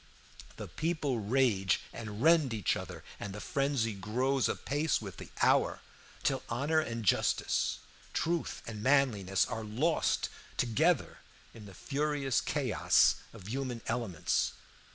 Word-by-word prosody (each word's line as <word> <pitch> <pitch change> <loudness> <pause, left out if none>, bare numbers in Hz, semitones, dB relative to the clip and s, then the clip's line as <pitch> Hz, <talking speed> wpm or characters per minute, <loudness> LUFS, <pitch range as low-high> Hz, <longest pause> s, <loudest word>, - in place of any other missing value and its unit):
The - - -6
people 155 -6 -1
rage 105 -5 +2
and 110 0 -6
rend 160 -7 +5
each 105 -5 +1
other, - - -7 0.2
and 100 -1 -5
the - - -6
frenzy 135 -2 0
grows 125 +7 0
apace 145 +3 0
with 100 -4 -8
the - - -9
hour, - - +3 0.4
till 135 -1 +1
honor 140 +7 +1
and 115 -6 -3
justice, - - +2 0.3
truth 170 0 -1
and 105 -2 -6
manliness, 110 -8 +3
are 110 - -4
lost 130 +11 +1 0.3
together 155 +9 +1 0.3
in 105 -2 -11
the 95 - -12
furious 145 -1 0
chaos - - +3
of 100 -4 -12
human 125 -2 -3
elements. 115 -8 0
120 Hz, 130 wpm, -32 LUFS, 105-140 Hz, 0.4 s, rend